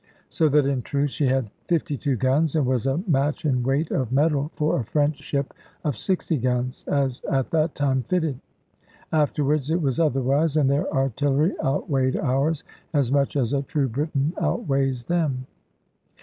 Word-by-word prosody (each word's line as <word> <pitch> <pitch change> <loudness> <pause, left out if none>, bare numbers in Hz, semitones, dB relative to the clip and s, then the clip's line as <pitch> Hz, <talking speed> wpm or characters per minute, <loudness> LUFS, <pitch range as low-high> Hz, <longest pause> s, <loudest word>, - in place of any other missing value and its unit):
So 155 - +2
that 145 0 +4
in 135 -2 0
truth 140 +2 -1
she 145 - 0
had 130 -5 0 0.2
fifty 160 -4 0
two 140 -1 -1
guns, 135 +6 +1
and 150 -4 +2
was 125 0 0
a 140 +7 0
match 150 0 +1
in 130 -4 +2
weight 135 +6 0
of 130 -3 -1
metal 145 +1 +2
for 150 -2 +1
a - - -1
French 145 +5 0
ship 140 -1 -3 0.3
of 150 -6 -1
sixty 180 - -1
guns, 125 0 -1
as 135 -3 0
at 135 -2 0
that 160 -1 +1
time 135 -2 +1
fitted. 160 -8 0 0.7
Afterwards 150 -2 +1
it 165 +2 +2
was 140 -4 0
otherwise; 145 +1 +2
and 140 -3 +3
their 140 +2 0
artillery 140 - +1
outweighed 135 -1 0
ours, 145 +4 0 0.3
as 135 -4 +2
much 140 0 +1
as 130 -3 +1
a 140 - +1
true 140 -1 -1
Briton 145 +4 -1
outweighs 135 - 0
them. 145 -4 -1
140 Hz, 170 wpm, -24 LUFS, 130-155 Hz, 0.7 s, that